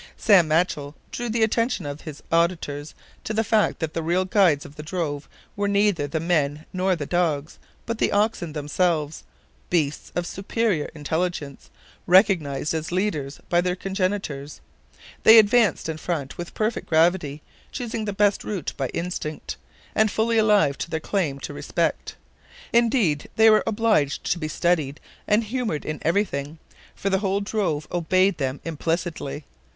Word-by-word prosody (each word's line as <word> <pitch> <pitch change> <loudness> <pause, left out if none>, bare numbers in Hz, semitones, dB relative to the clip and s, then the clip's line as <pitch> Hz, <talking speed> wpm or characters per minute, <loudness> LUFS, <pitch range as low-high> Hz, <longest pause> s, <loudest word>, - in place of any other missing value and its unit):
Sam 190 -6 +5
Machell 155 -3 0 0.2
drew 240 -1 -4
the 225 0 +1
attention 230 - 0
of 145 +1 -6
his 150 -3 -9
auditors 165 -3 0 0.3
to 215 - -3
the 225 - +2
fact 215 -1 +2
that 160 -2 -3
the 165 - -2
real 175 +3 +1
guides 180 -6 +3
of 145 0 -12
the 150 - -7
drove 150 -3 -4 0.3
were 205 0 0
neither 200 -7 +2
the 160 +3 -2
men 155 -2 0
nor 185 0 +1
the 150 -4 -4
dogs, 155 -3 -1 0.3
but 230 -1 -3
the - - +2
oxen 205 -6 0
themselves, 155 +1 -1 0.5
beasts 150 -5 -1
of 175 - -1
superior 195 -3 -1
intelligence, 155 -2 -3 0.4
recognized 170 -7 +3
as 160 +1 -3
leaders 175 -7 -2
by 175 0 +3
their 180 0 -1
congenitors. 185 -7 -3 0.6
They 220 +1 +9
advanced 220 -4 +4
in 160 -1 -3
front 155 -5 -3
with 175 0 -7
perfect 220 +1 -1
gravity, 160 -3 +2 0.3
choosing 230 -3 -4
the 205 - -2
best 205 0 +2
route 195 -8 -4
by 135 - -1
instinct, 165 -3 -4 0.4
and 220 0 +3
fully 225 +2 +1
alive 210 -10 +3
to - - -4
their 160 - -2
claim 160 -5 -1
to - - -6
respect. - - -2 0.6
Indeed, 230 - +2
they 220 0 +7
were 215 - +5
obliged 215 -10 +1
to 175 - 0
be 155 - -3
studied 155 -4 0 0.3
and 210 +2 +3
humored 225 - -3
in 155 -1 -4
everything, 160 -5 -1 0.4
for 200 - -2
the 190 - +2
whole 195 0 0
drove 200 -8 -1
obeyed 185 +2 +2
them 135 0 -2
implicitly. 160 -2 -3
175 Hz, 155 wpm, -24 LUFS, 150-205 Hz, 0.6 s, They